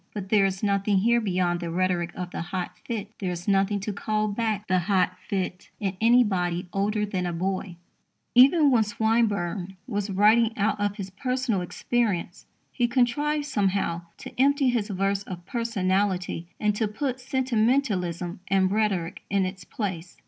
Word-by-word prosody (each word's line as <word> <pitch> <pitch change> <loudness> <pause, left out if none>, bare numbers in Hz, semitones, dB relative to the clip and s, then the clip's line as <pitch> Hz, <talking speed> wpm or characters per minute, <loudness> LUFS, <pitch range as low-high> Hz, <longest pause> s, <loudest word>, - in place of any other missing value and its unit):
But 195 -2 -5
there 200 -2 +4
is 190 +1 -5
nothing 200 0 +2
here 235 +4 +3
beyond 180 -4 0
the 170 -1 -4
rhetoric 175 0 0
of 180 -1 -5
the - - -4
hot 180 +1 -4
fit. 215 -3 -4
There 190 - -2
is 175 0 -5
nothing 200 +1 +2
to 205 +1 -3
call 215 +1 -1
back 215 -1 -1
the 185 -1 +3
hot 185 0 +1
fit 185 -2 -3
in 195 -2 -2
anybody 195 -7 +3
older 210 +2 0
than 185 -3 -2
a - - -2
boy. 185 +1 -3 0.6
Even 280 +4 +6
when 240 -3 +5
Swinburne 205 -4 0
was 205 -5 -3
writing 220 +4 +4
out 210 +1 +1
of 205 0 0
his 195 -2 -6
personal 250 -1 -1
experience, 190 -1 -2 0.2
he 240 - +1
contrived 290 +5 +1
somehow 195 - 0 0.2
to - - -9
empty 280 -1 +4
his 235 -4 0
verse 195 -1 0
of 180 -3 -8
personality 190 -6 -1
and 210 -1 +2
to 220 - +1
put 255 +5 -3
sentimentalism 225 -9 0
and 190 -1 +2
rhetoric 200 -5 0
in 195 -1 +2
its 185 0 -6
place. 180 -4 -5
200 Hz, 165 wpm, -26 LUFS, 185-225 Hz, 0.6 s, Even